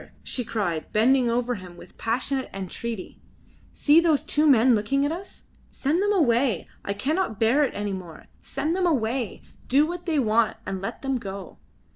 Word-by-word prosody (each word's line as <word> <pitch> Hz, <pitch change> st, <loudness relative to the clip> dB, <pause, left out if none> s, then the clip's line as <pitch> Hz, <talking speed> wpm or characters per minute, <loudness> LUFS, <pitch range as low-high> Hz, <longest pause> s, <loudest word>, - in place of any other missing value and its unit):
she 250 Hz, -, -2 dB
cried, 200 Hz, -9 st, -3 dB
bending 245 Hz, +3 st, +3 dB
over 245 Hz, +1 st, 0 dB
him 185 Hz, -5 st, -9 dB
with 175 Hz, -, -14 dB
passionate 255 Hz, +4 st, -1 dB
entreaty. 195 Hz, +2 st, -6 dB, 0.5 s
"See 300 Hz, +2 st, +5 dB
those 325 Hz, -4 st, +2 dB
two 300 Hz, +1 st, +3 dB
men 250 Hz, -1 st, +6 dB
looking 235 Hz, +6 st, +1 dB
at 290 Hz, -, 0 dB
us. 365 Hz, +4 st, -8 dB, 0.3 s
Send 305 Hz, +6 st, 0 dB
them 410 Hz, +1 st, +2 dB
away. 245 Hz, -, +2 dB, 0.2 s
I 200 Hz, -, -2 dB
cannot 280 Hz, -, -1 dB
bear 235 Hz, +7 st, +4 dB
it -, -, -5 dB
any 205 Hz, -1 st, -2 dB
more. 175 Hz, -4 st, -8 dB, 0.2 s
Send 300 Hz, +5 st, -2 dB
them 370 Hz, -1 st, +1 dB
away. 245 Hz, -, -1 dB, 0.2 s
Do 280 Hz, +4 st, +4 dB
what 350 Hz, +2 st, -6 dB
they 320 Hz, -3 st, +1 dB
want 225 Hz, -3 st, +2 dB
and 190 Hz, -1 st, -4 dB
let 195 Hz, -, -5 dB
them 270 Hz, -2 st, 0 dB
go." 195 Hz, -, -8 dB
245 Hz, 175 wpm, -25 LUFS, 210-290 Hz, 0.5 s, men